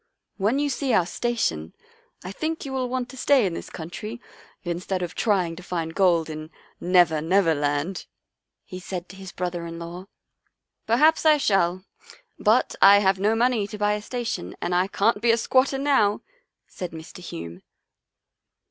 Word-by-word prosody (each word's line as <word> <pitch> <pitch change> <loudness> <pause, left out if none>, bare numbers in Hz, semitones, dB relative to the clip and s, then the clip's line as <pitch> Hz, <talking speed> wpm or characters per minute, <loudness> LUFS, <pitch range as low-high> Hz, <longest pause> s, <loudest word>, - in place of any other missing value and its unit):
When 210 +6 +1
you 290 +1 +1
see 275 -2 -1
our 185 -5 +4
station 170 - -2 0.5
I 185 - -6
think 315 +9 -4
you 270 - -5
will 255 -2 -1
want 255 -1 -2
to 265 - -11
stay 265 -3 +3
in 180 - -1
this - - -7
country 210 +8 -7 0.4
instead 180 +1 -3
of 175 -1 -5
trying 185 -6 0
to - - -8
find 165 -2 -4
gold 175 -4 +3
in 155 0 -7 0.2
' - - -37
Never, 175 -3 +3
Never 170 +1 +3
Land,' 145 +5 -2 0.3
" - - -61
he 185 - -8
said 180 -1 -6
to 190 - -11
his 190 -1 -9
brother 175 -1 -4
in 165 0 -7
law. 170 +3 -8 0.4
" - - -53
Perhaps 300 +8 +4
I 310 -1 +6
shall, 185 -7 +1 0.6
but 220 +4 +2
I 200 +1 +9
have 190 -1 +2
no 210 +3 +2
money 235 -3 +1
to 210 - -8
buy 210 0 +1
a 210 - -3
station 230 - -4
and 175 - -2
I 180 +2 +2
can't 205 +2 +1
be 235 - +2
a 230 - +5
squatter 260 +3 +2
now," 270 -7 +2 0.4
said 180 -3 -7
Mr. 160 +2 -10
Hume. 85 - -8
195 Hz, 185 wpm, -24 LUFS, 170-235 Hz, 0.6 s, I